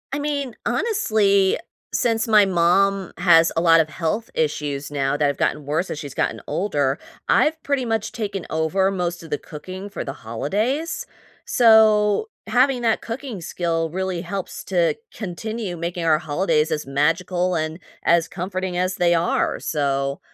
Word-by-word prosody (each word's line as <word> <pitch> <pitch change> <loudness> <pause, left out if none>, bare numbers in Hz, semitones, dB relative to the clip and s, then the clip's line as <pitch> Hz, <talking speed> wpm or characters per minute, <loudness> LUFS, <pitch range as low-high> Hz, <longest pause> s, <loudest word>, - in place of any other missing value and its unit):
I - - -2
mean, 285 -4 -2
honestly, 215 - +2 0.3
since 230 0 +1
my 210 -2 +6
mom 190 +1 +2
has 170 -2 +5
a 165 - +3
lot 165 -1 +6
of 160 -1 +2
health 185 +8 -2
issues 145 -2 -2
now, 140 0 0
that 150 - +2
have 140 -1 0
gotten 150 -1 -1
worse 155 +6 -1
as - - -4
she's 145 -3 -7
gotten - - -1
older, 145 -8 0 0.3
I've 315 0 +3
pretty 280 -2 0
much 225 -2 -1
taken 205 -6 -4
over 170 +5 +1
most 175 -3 -3
of 160 - -12
the 145 - -1
cooking 185 +6 -8
for 200 - -5
the 135 - -5
holidays. 210 - -2 0.4
So, 220 - +5 0.2
having 255 0 +2
that 225 -1 +2
cooking 235 -4 -6
skill 165 -1 -1
really 185 0 -3
helps 190 +1 -5
to 175 -3 +1 0.2
continue 215 0 -4
making 170 +1 -3
our 155 -1 +4
holidays 160 0 +1
as 150 -1 -2
magical 175 +6 0
and 155 +1 -2 0.2
as 170 0 +3
comforting 185 0 -4
as 185 +1 0
they 175 -1 +3
are. 165 +1 0
So 140 -2 -1
180 Hz, 160 wpm, -22 LUFS, 160-210 Hz, 0.4 s, my